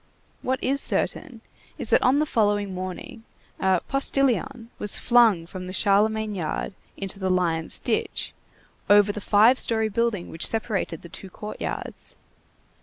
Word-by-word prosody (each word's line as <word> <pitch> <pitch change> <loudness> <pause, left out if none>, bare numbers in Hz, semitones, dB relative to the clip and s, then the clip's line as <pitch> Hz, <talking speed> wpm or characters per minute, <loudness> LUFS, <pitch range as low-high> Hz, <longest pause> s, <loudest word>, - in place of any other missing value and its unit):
What 260 +1 -1
is 275 +2 +1
certain 255 -8 -1 0.4
is, - - -5
that - - +5
on 255 +3 +3
the 305 - +2
following 205 -6 0
morning, 185 +4 -7 0.4
a 190 -2 +2
"postilion" 270 -3 0
was 210 - +2
flung 230 -8 +4
from 185 +1 -8
the 185 - -6
Charlemagne 215 +2 +2
yard 180 +1 -3 0.2
into 195 0 -3
the 190 -1 -1
Lions' 170 -3 0
Ditch, - - -2 0.6
over 205 0 +6
the 210 - -7
five 220 +6 +4
story 220 -1 0
building 215 -3 -1
which 165 - 0
separated 210 -7 -2
the 170 - -10
two 190 +3 -9
court 210 +3 -9
yards. - - -5
205 Hz, 150 wpm, -24 LUFS, 185-230 Hz, 0.6 s, over